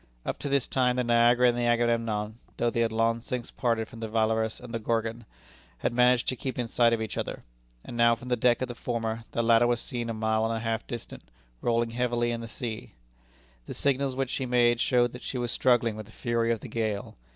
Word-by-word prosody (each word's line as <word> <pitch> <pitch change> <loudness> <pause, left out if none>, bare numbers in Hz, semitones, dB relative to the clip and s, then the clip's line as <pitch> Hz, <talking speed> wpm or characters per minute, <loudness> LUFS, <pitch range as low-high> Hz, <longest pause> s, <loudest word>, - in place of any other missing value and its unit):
Up - - -3
to 145 - -3
this 140 -2 +2
time 125 -2 +1
the 125 - +1
Niagara 120 +1 +5
and 120 - +3
the 120 0 0
Agamemnon 115 -2 0 0.2
(though 120 - +1
they 115 - -2
had 115 -1 +2
long 115 +1 +1
since 120 0 -4
parted 115 -3 0
from 115 - -12
the 115 - -4
Valorous 110 0 0
and 125 -1 -10
the 115 - -1
Gorgon) 115 0 -2 0.5
had 60 - -1
managed 125 0 +4
to 130 - -1
keep 130 0 -5
in 120 -2 -1
sight 115 0 +3
of 115 -1 0
each 110 - -4
other; - - -4 0.4
and - - -7
now 115 0 +5
from 125 +2 -11
the 125 - +3
deck 120 +1 +2
of - - -2
the 120 - -5
former 115 -1 -3
the 115 - +1
latter 115 +1 +5
was 120 0 +1
seen 120 -1 -3
a - - -1
mile 110 0 +1
and 115 0 0
a - - -2
half 115 -1 -2
distant, 120 - -8 0.3
rolling 115 -1 +1
heavily 120 0 0
in 115 0 -3
the 115 - -6
sea. 110 - -6 0.7
The - - -6
signals 140 -1 0
which 135 -1 -1
she 130 - -2
made 120 -1 +3
showed 120 -2 +3
that 125 - -9
she 130 - -4
was 120 -1 -2
struggling 120 -4 +2
with 110 -1 -8
the - - -15
fury 115 0 0
of 115 - -1
the - - -7
gale. 110 -3 -3
115 Hz, 240 wpm, -28 LUFS, 115-120 Hz, 0.7 s, Niagara